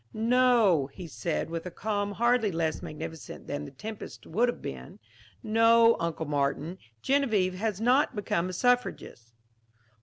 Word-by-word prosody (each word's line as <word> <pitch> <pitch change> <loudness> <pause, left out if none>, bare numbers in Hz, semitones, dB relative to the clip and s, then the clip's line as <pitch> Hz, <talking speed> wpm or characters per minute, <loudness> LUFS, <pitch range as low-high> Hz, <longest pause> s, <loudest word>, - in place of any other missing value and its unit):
"No," 225 - +3
he 180 - -9
said 165 0 -3
with 165 +1 -4
a - - -3
calm 205 +2 -2
hardly 235 -1 +2
less 165 -2 -1
magnificent 155 +1 -8
than 145 +1 -4
the - - -8
tempest 215 +10 -8
would 240 +3 +1
have - - -4
been, - - -8 0.5
"no, 230 +1 +5
Uncle 165 -1 -2
Martin, 145 +4 -1 0.2
Genevieve 220 -10 +2
has 205 +1 -2
not 255 +4 +3
become 185 -3 -1
a - - -5
suffragist." 210 - -1
205 Hz, 145 wpm, -28 LUFS, 165-230 Hz, 0.5 s, no